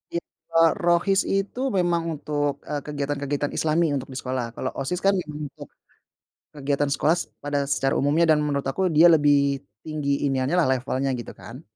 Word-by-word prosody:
Ya, -, -, +2 dB, 0.4 s
eee, 165 Hz, 0 st, +7 dB
Rohis 175 Hz, +3 st, +3 dB
itu 195 Hz, +5 st, -1 dB, 0.2 s
memang 175 Hz, -2 st, +2 dB, 0.2 s
untuk, 145 Hz, -1 st, -2 dB
eee, 145 Hz, -1 st, -3 dB
kegiatan 145 Hz, -1 st, -3 dB
kegiatan 145 Hz, 0 st, -2 dB
islami 160 Hz, -1 st, +1 dB
untuk 135 Hz, 0 st, -4 dB
di -, -, -5 dB
sekolah, 130 Hz, -2 st, -2 dB
kalau 130 Hz, -, -2 dB
OSIS, 175 Hz, +7 st, -3 dB
kan, 195 Hz, -, +5 dB
memang 150 Hz, -1 st, -8 dB
untuk -, -, -12 dB, 0.9 s
kegiatan 140 Hz, 0 st, 0 dB
sekolah 155 Hz, +4 st, +2 dB
s -, -, -1 dB, 0.2 s
pada 145 Hz, 0 st, -1 dB
secara 135 Hz, -1 st, +1 dB
umumnya, 150 Hz, +5 st, +3 dB
dan 150 Hz, -, +4 dB
menurut 140 Hz, -2 st, -1 dB
aku 185 Hz, +7 st, 0 dB
dia 160 Hz, +2 st, +5 dB
lebih 140 Hz, -2 st, +3 dB, 0.2 s
tinggi 145 Hz, -2 st, -1 dB
iniannya, 135 Hz, +4 st, 0 dB
lah, 175 Hz, -, +4 dB
levelnya, 130 Hz, +1 st, -2 dB
gitu, 120 Hz, -2 st, -6 dB
kan. 125 Hz, +7 st, -10 dB
145 Hz, 180 wpm, -24 LUFS, 140-165 Hz, 0.9 s, eee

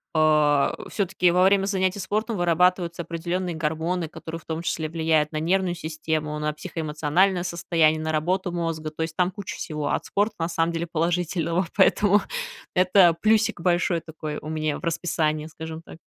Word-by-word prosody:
А, 150 Hz, -2 st, +3 dB
всё-таки 190 Hz, -3 st, +1 dB
во 180 Hz, +1 st, +4 dB
время 195 Hz, 0 st, +4 dB
занятий 190 Hz, 0 st, 0 dB
спортом 215 Hz, +2 st, -2 dB
вырабатываются 175 Hz, 0 st, +2 dB
определённые 170 Hz, +2 st, -3 dB
гормоны, 160 Hz, +3 st, -1 dB
которые 165 Hz, 0 st, -7 dB
в -, -, -26 dB
том 160 Hz, +1 st, -4 dB
числе 160 Hz, -2 st, -2 dB
влияют 160 Hz, -2 st, +1 dB
на 155 Hz, -, -4 dB
нервную 180 Hz, +2 st, +1 dB
систему, 155 Hz, -2 st, -3 dB
на 150 Hz, 0 st, -1 dB
психоэмоциональное 165 Hz, +2 st, 0 dB
состояние, 165 Hz, -3 st, +1 dB
на 160 Hz, -, -2 dB
работу 180 Hz, +4 st, 0 dB
мозга. 165 Hz, -2 st, -3 dB
То 160 Hz, +1 st, -3 dB
есть 160 Hz, 0 st, -5 dB
там 180 Hz, 0 st, +2 dB
куча 200 Hz, -1 st, -7 dB
всего 150 Hz, -2 st, -3 dB
от -, -, 0 dB
спорта 210 Hz, +2 st, 0 dB
на 165 Hz, +1 st, -1 dB
самом 165 Hz, 0 st, 0 dB
деле 165 Hz, +1 st, -2 dB
положительного, 170 Hz, +1 st, 0 dB
поэтому 205 Hz, +1 st, +4 dB, 0.5 s
это 180 Hz, -2 st, +5 dB
плюсик 215 Hz, -4 st, +2 dB
большой 175 Hz, -1 st, +2 dB
такой 155 Hz, -2 st, -6 dB
у 155 Hz, -, -8 dB
меня 155 Hz, -1 st, -2 dB
в -, -, -18 dB
расписании, 155 Hz, -2 st, -1 dB
скажем 160 Hz, 0 st, -8 dB
так. -, -, -12 dB
170 Hz, 170 wpm, -24 LUFS, 155-180 Hz, 0.5 s, это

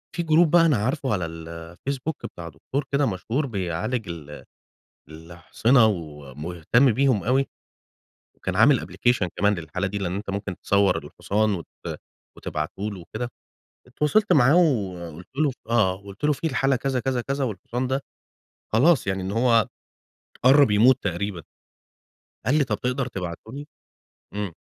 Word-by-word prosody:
في 175 Hz, -, -1 dB
جروب 160 Hz, 0 st, +4 dB
بقى 175 Hz, -1 st, +6 dB
أنا 150 Hz, -7 st, +3 dB
عارفُه 130 Hz, +4 st, -1 dB
على 90 Hz, -4 st, -1 dB
الفيسبوك 85 Hz, -, -6 dB
بتاع 85 Hz, -1 st, -8 dB
دكتور 130 Hz, -, -4 dB
كده 140 Hz, +1 st, +2 dB
مشهور 115 Hz, +6 st, -1 dB
بيعالج 105 Hz, 0 st, -3 dB
ال 75 Hz, -3 st, -8 dB, 0.7 s
الأحصنة 85 Hz, -, +1 dB
ومهتم 85 Hz, -, 0 dB
بيهم 130 Hz, -4 st, +2 dB
أوي، 135 Hz, +3 st, +2 dB, 0.9 s
وكان 95 Hz, -, -4 dB
عامل 125 Hz, +7 st, +5 dB
application 120 Hz, -6 st, 0 dB
كمان 100 Hz, 0 st, +4 dB
للحالة 90 Hz, +3 st, -3 dB
دي، 100 Hz, +2 st, -4 dB
لأن 95 Hz, -2 st, -2 dB
أنت 100 Hz, 0 st, -5 dB
ممكن 100 Hz, -1 st, -3 dB
تصوَّر 100 Hz, 0 st, +2 dB
الحصان 105 Hz, +1 st, -1 dB
وت 85 Hz, -4 st, -7 dB, 0.7 s
وتبعتُه 75 Hz, +6 st, -4 dB
لُه 95 Hz, -, -8 dB
وكده، 120 Hz, +8 st, -5 dB, 0.6 s
اتواصلت 150 Hz, -, +1 dB
معاه 145 Hz, +1 st, +5 dB
وقُلت 90 Hz, -, 0 dB
له 150 Hz, -2 st, +3 dB, 0.2 s
آه 105 Hz, -6 st, +3 dB
قُلت 100 Hz, +5 st, -10 dB
له 150 Hz, -, +4 dB
في 150 Hz, -, -3 dB
الحالة 135 Hz, -2 st, +2 dB
كذا، 130 Hz, 0 st, -1 dB
كذا، 130 Hz, -1 st, -1 dB
كذا 135 Hz, +3 st, -2 dB
والحصان 120 Hz, +3 st, -3 dB
ده، 135 Hz, +2 st, 0 dB, 0.7 s
خلاص 135 Hz, -, +4 dB
يعني 95 Hz, -1 st, -1 dB
إن 95 Hz, -, -3 dB
هو 115 Hz, -1 st, +3 dB, 0.8 s
قرَّب 135 Hz, 0 st, +6 dB
يموت 115 Hz, +5 st, +6 dB
تقريبًا، 95 Hz, -1 st, -3 dB, 1.0 s
قال 130 Hz, -, +3 dB
لي: 145 Hz, -, +3 dB
"طَب 110 Hz, -5 st, -3 dB
تقدر 125 Hz, +1 st, -1 dB
تبعته 90 Hz, 0 st, -6 dB
لي؟" 145 Hz, +2 st, -7 dB, 0.7 s
إمم. 100 Hz, -4 st, -3 dB
110 Hz, 145 wpm, -24 LUFS, 90-135 Hz, 1.0 s, بقى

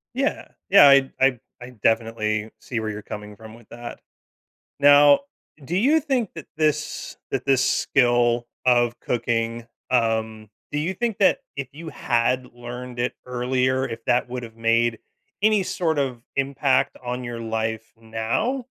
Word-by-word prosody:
Yeah. 275 Hz, +2 st, -1 dB, 0.2 s
Yeah, 185 Hz, -7 st, +9 dB
I 140 Hz, -1 st, +5 dB
I 130 Hz, -2 st, +3 dB, 0.2 s
I 125 Hz, +1 st, -9 dB
definitely 110 Hz, -1 st, 0 dB
see 120 Hz, -3 st, -4 dB
where 110 Hz, 0 st, -3 dB
you're 105 Hz, 0 st, -6 dB
coming 105 Hz, 0 st, -8 dB
from 110 Hz, +1 st, -12 dB
with 115 Hz, -1 st, -17 dB
that. 120 Hz, 0 st, -9 dB, 0.8 s
Now, 145 Hz, 0 st, +7 dB, 0.4 s
do 170 Hz, +6 st, -2 dB
you 280 Hz, +11 st, +4 dB
think 265 Hz, -, -1 dB
that 165 Hz, -, -8 dB
this 150 Hz, -1 st, -1 dB
that 135 Hz, -, -2 dB
this 135 Hz, -2 st, +3 dB
skill 120 Hz, -2 st, +2 dB, 0.2 s
of 120 Hz, -1 st, +3 dB
cooking, 115 Hz, -1 st, -2 dB, 0.2 s
um 110 Hz, -3 st, 0 dB, 0.2 s
do 145 Hz, -, -1 dB
you 165 Hz, +6 st, -1 dB
think 230 Hz, 0 st, -2 dB
that 195 Hz, -, +4 dB, 0.2 s
if 140 Hz, -2 st, -4 dB
you 160 Hz, +3 st, -9 dB
had 125 Hz, -1 st, 0 dB
learned 120 Hz, +1 st, -8 dB
it 120 Hz, +1 st, -1 dB
earlier, 125 Hz, +1 st, 0 dB
if 115 Hz, 0 st, -7 dB
that 125 Hz, +1 st, +2 dB
would've 120 Hz, -2 st, -7 dB
made 115 Hz, 0 st, +2 dB, 0.4 s
any 215 Hz, -2 st, +4 dB
sort 165 Hz, -4 st, -1 dB
of 130 Hz, -4 st, -2 dB
impact 135 Hz, 0 st, +1 dB
on 125 Hz, +1 st, -3 dB
your 120 Hz, -1 st, -5 dB
life 110 Hz, 0 st, -3 dB
now? 115 Hz, -, -2 dB
125 Hz, 150 wpm, -23 LUFS, 115-140 Hz, 0.8 s, Yeah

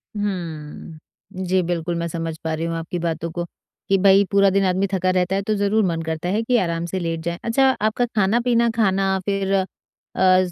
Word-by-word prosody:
हम्म। 170 Hz, -2 st, -6 dB
जी, 185 Hz, +1 st, +2 dB
बिल्कुल, 170 Hz, -1 st, -2 dB
मैं 170 Hz, 0 st, -2 dB
समझ 165 Hz, -1 st, -4 dB
पा 160 Hz, -1 st, -2 dB
रही 160 Hz, +1 st, -2 dB
हूँ 165 Hz, 0 st, -2 dB
आपकी 165 Hz, +2 st, -4 dB
बातों 165 Hz, -1 st, -2 dB
को, 175 Hz, +1 st, -4 dB, 0.4 s
कि 195 Hz, -, +4 dB
भई, 195 Hz, +1 st, +5 dB
पूरा 200 Hz, 0 st, +5 dB
दिन 195 Hz, +1 st, +2 dB
आदमी 190 Hz, +2 st, +1 dB
थका 185 Hz, -1 st, +1 dB
रहता 185 Hz, 0 st, +1 dB
है, 195 Hz, -, 0 dB
तो 215 Hz, +2 st, -1 dB
ज़रूर 205 Hz, +2 st, +2 dB
मन 165 Hz, -2 st, -1 dB
करता 160 Hz, +2 st, -3 dB
है 210 Hz, +4 st, +1 dB
कि 245 Hz, +2 st, +2 dB
आराम 170 Hz, -4 st, -1 dB
से 185 Hz, +2 st, -3 dB
लेट 165 Hz, -2 st, -2 dB
जाएँ। 170 Hz, +1 st, -3 dB
अच्छा, 265 Hz, +4 st, +3 dB
आपका 215 Hz, +3 st, +1 dB
खाना-पीना 235 Hz, +3 st, +2 dB
खाना, 195 Hz, -3 st, +1 dB
फिर 195 Hz, -1 st, -1 dB, 0.7 s
अज़ 185 Hz, -1 st, +4 dB
185 Hz, 200 wpm, -22 LUFS, 170-200 Hz, 0.7 s, भई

